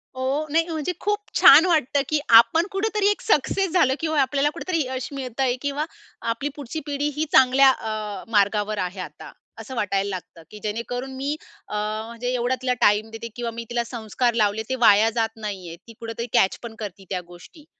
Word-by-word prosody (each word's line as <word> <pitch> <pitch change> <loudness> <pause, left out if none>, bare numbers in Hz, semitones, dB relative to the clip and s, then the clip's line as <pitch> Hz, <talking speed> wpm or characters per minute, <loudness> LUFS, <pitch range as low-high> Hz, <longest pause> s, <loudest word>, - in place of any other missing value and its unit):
हो, 270 +4 -1
नाही 330 +2 +2
म्हणजे 315 +1 -2
खूप 415 +1 0 0.2
छान 295 +5 +9
वाटतं 300 -5 +2
की 305 -1 +2 0.2
आपण 325 - +4
कुठेतरी 410 +1 0
एक - - -3
सक्सेस 385 0 +1
झालं 265 -8 +3
किंवा 315 -3 +1
आपल्याला 280 +2 +1
कुठेतरी 330 -1 -2
यश 260 -1 -4
मिळतंय 260 -1 -1
किंवा 285 +2 -2 0.4
आपली 235 +6 -2
पुढची 290 +2 -6
पिढी 290 0 -1
ही 310 +1 0
चांगल्या 265 +1 +6
अ, 215 -4 -5
मार्गावर 210 0 +2
आहे 185 +1 -6
आता. 185 - -8 0.3
असं 260 - -8
वाटायला 200 -2 0
लागतं. 180 -3 -7
की 210 - -10
जेणेकरून 245 +5 -4
मी 280 +3 -2 0.3
अ, - - -6 0.3
म्हणजे 245 +2 -4
एवढा 250 +1 0
तिला 250 -1 +1
टाईम 210 +2 +3
देते 225 +1 -7
किंवा 240 -1 -3
मी 230 +1 -6
तिला 240 0 0
संस्कार 235 +1 -1
लावले 215 -1 +1
ते 260 - 0
वाया 210 +2 +6
जात 225 -1 +1
नाहीये. 190 -5 -6
ती 230 - -11
कुठेतरी 230 +1 -5
कॅच 190 - +3
पण 230 -2 -8
करती 200 -2 -7
त्या 185 -2 -2
गोष्टी. 175 - -15
245 Hz, 185 wpm, -23 LUFS, 215-290 Hz, 0.4 s, छान